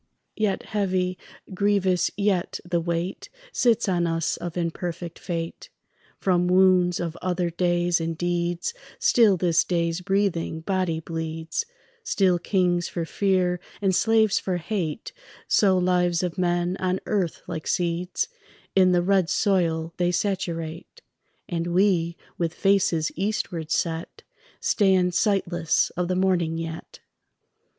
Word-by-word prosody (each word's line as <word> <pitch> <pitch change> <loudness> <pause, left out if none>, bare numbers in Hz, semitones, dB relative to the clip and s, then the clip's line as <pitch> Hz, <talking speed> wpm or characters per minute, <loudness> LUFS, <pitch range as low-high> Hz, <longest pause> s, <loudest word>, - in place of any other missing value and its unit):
Yet 210 -3 0
heavy, 185 -3 -1 0.4
grievous 190 -2 +2
yet 200 -3 0
the 175 -1 0
weight 170 +2 -3 0.2
Sits 235 -3 +2
on 175 -2 +1
us 165 -1 0
of 175 0 -6
imperfect 170 0 -4
fate. 165 -1 -5 0.5
From 180 -2 +1
wounds 180 -1 +4
of 170 -2 -3
other 180 -1 -1
days 175 0 +1
and 165 0 -3
deeds 175 - -1 0.2
Still 235 - +4
this 170 -2 +3
day's 170 -1 -1
breathing 190 -4 0
body 185 -2 -1
bleeds; 160 - -4 0.4
Still 190 - +2
kings 175 -2 +1
for 170 -2 -3
fear 185 -1 +1 0.2
and 195 -2 +1
slaves 220 -1 +3
for 185 -2 -2
hate 175 +1 -3 0.3
Sow 190 -3 +4
lives 180 -1 +2
of 180 -2 -2
men 175 0 0
on 185 0 0
earth 190 -6 -1
like 165 -3 -5
seeds 180 - -1 0.5
In 185 -1 +5
the 175 0 +3
red 190 -2 +2
soil 170 -5 +1
they 175 0 +1
saturate; 170 -3 -3 0.4
And 170 -2 -2
we, 175 -2 +2 0.2
with 165 -2 -1
faces 185 -5 +2
eastward 180 -4 -2
set, 165 0 -2 0.4
Stand 190 -3 +2
sightless 175 -4 +1
of 180 0 -2
the 185 - 0
morning 180 -3 +1
yet. 165 0 -7
180 Hz, 125 wpm, -25 LUFS, 170-190 Hz, 0.5 s, In